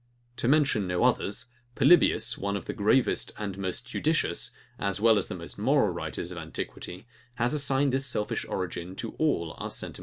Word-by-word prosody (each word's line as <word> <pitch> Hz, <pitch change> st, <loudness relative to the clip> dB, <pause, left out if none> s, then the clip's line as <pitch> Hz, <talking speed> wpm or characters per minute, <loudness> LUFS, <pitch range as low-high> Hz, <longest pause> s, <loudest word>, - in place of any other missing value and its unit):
To 120 Hz, -, 0 dB
mention 140 Hz, -8 st, +3 dB
no 90 Hz, +3 st, 0 dB
others, 125 Hz, -1 st, +1 dB, 0.3 s
Polybius, 175 Hz, -2 st, +5 dB
one 100 Hz, +1 st, -2 dB
of 100 Hz, -, -8 dB
the -, -, -4 dB
gravest 115 Hz, +4 st, +2 dB
and 100 Hz, -3 st, -4 dB
most 95 Hz, -2 st, -3 dB
judicious, -, -, 0 dB, 0.3 s
as 100 Hz, -1 st, -1 dB
well 110 Hz, +1 st, +6 dB
as -, -, -4 dB
most 85 Hz, +2 st, -6 dB
moral 130 Hz, 0 st, +3 dB
writers 85 Hz, +1 st, -5 dB
of 90 Hz, -, -6 dB
antiquity, 90 Hz, +4 st, -6 dB, 0.3 s
has 120 Hz, +2 st, 0 dB
assigned 140 Hz, -2 st, +1 dB
this 135 Hz, +1 st, +2 dB
selfish 105 Hz, -5 st, -1 dB
origin 90 Hz, 0 st, -4 dB
to 115 Hz, +3 st, -4 dB
all 85 Hz, -, +1 dB
our -, -, -4 dB
sentiments -, -, -1 dB
of -, -, -4 dB
virtue. -, -, -9 dB
105 Hz, 185 wpm, -28 LUFS, 90-130 Hz, 0.3 s, well